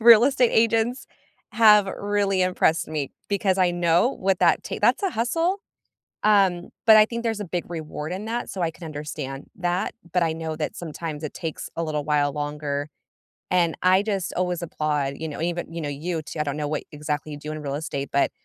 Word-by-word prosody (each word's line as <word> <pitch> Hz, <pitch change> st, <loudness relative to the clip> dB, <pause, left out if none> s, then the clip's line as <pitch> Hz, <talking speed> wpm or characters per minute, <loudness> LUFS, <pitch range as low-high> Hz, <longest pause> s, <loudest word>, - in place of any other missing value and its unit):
real 230 Hz, 0 st, +9 dB
estate 260 Hz, -3 st, +3 dB
agents 230 Hz, +3 st, +2 dB, 0.5 s
have 210 Hz, -3 st, +6 dB
really 200 Hz, -2 st, +1 dB
impressed 175 Hz, -3 st, +2 dB
me 150 Hz, -3 st, -3 dB, 0.2 s
because 195 Hz, -2 st, +1 dB
I 180 Hz, -1 st, +4 dB
know 175 Hz, +6 st, +3 dB
what 190 Hz, -6 st, 0 dB
that -, -, +4 dB
take -, -, -5 dB
that's -, -, +3 dB
a 390 Hz, -, +1 dB
hustle, 330 Hz, -, 0 dB, 0.6 s
um, 195 Hz, -4 st, +3 dB, 0.2 s
but 220 Hz, -1 st, +9 dB
I 215 Hz, -, +8 dB
think 235 Hz, +1 st, -4 dB
there's 225 Hz, -2 st, -1 dB
a -, -, -2 dB
big 175 Hz, 0 st, -3 dB
reward 155 Hz, -1 st, -5 dB
in 195 Hz, +3 st, -4 dB
that, 235 Hz, +2 st, -3 dB
so 185 Hz, -, -4 dB
I 165 Hz, -, +1 dB
can 170 Hz, -, -12 dB
understand 145 Hz, -2 st, -6 dB
that. 175 Hz, 0 st, -1 dB, 0.2 s
But 180 Hz, -1 st, +3 dB
I 165 Hz, -, +1 dB
know 160 Hz, 0 st, -4 dB
that 155 Hz, -, -3 dB
sometimes 160 Hz, -2 st, -5 dB
it 150 Hz, -, -5 dB
takes 165 Hz, -3 st, -5 dB
a 165 Hz, -, -1 dB
little 150 Hz, -2 st, -2 dB
while 145 Hz, -1 st, +2 dB
longer. 145 Hz, 0 st, -3 dB, 0.6 s
And 175 Hz, -3 st, +2 dB
I 185 Hz, +2 st, +5 dB
just 200 Hz, -4 st, -2 dB
always 180 Hz, -2 st, -1 dB
applaud, 150 Hz, -4 st, -1 dB
you 160 Hz, 0 st, -4 dB
know, 150 Hz, -, -6 dB
even 175 Hz, 0 st, -2 dB
you 170 Hz, -, -4 dB
know, 145 Hz, -, -3 dB
you 160 Hz, +3 st, -3 dB
t 155 Hz, -, -8 dB
I -, -, +4 dB
don't 140 Hz, 0 st, -3 dB
know 150 Hz, -, -2 dB
what 150 Hz, 0 st, -2 dB
exactly 150 Hz, 0 st, -3 dB
you 145 Hz, -, -6 dB
do 150 Hz, +1 st, -6 dB
in 155 Hz, -, -6 dB
real 140 Hz, -1 st, -3 dB
estate, 140 Hz, -2 st, -4 dB
but 140 Hz, -, +3 dB
170 Hz, 210 wpm, -24 LUFS, 150-200 Hz, 0.6 s, real